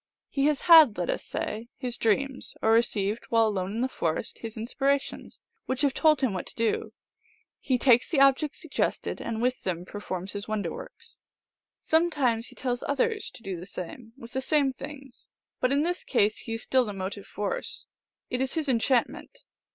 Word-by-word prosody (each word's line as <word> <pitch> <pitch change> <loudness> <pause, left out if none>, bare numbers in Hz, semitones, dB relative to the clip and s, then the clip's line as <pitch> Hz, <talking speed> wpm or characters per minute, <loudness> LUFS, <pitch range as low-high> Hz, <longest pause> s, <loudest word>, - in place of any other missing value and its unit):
He 275 0 +2
has 300 -3 +1
had, 320 -10 +8
let 175 - 0
us - - -3
say, 225 +3 -4
his 250 -2 -3
dreams, 260 +5 0
or 220 - +4
received, 220 -1 +2
while 230 -1 +3
alone 195 -3 -1
in 225 +3 -2
the 255 - +2
forest, 165 -5 -2
his 225 -1 -7
inspirations, 275 +5 -2 0.3
which 260 +1 -1
have 280 -2 +3
told 305 -2 +4
him 255 -6 +1
what 185 - -4
to - - -10
do. 230 -1 0 0.7
He 260 -2 +1
takes 245 -1 +4
the 320 - +1
ob 275 -1 +7
jects 300 -2 -3
suggested, 320 -4 -2
and 230 0 -3
with 255 +1 0
them 180 -1 -3
performs 190 -1 -5
his 205 0 -4
wonder 215 -1 -2
works. - - -10 0.6
Sometimes 290 -9 +1
he - - -12
tells 245 -2 -2
others 415 - 0
to 230 - -15
do 190 -3 -4
the 180 - -8
same 225 +5 -8
with 235 -2 -11
the 265 - -1
same 280 -1 +2
things, 270 -1 -10 0.3
but 255 - +1
in 285 +2 +3
this 355 +2 -2
case 215 -4 +2
he 225 - -5
is 225 - -5
still 260 -1 +3
the 210 -3 -5
motive 195 +1 -5
force; 210 - -4 0.5
it 250 - 0
is 265 +3 -1
his 315 -2 -1
enchantment. 255 - 0
245 Hz, 190 wpm, -27 LUFS, 215-275 Hz, 0.7 s, had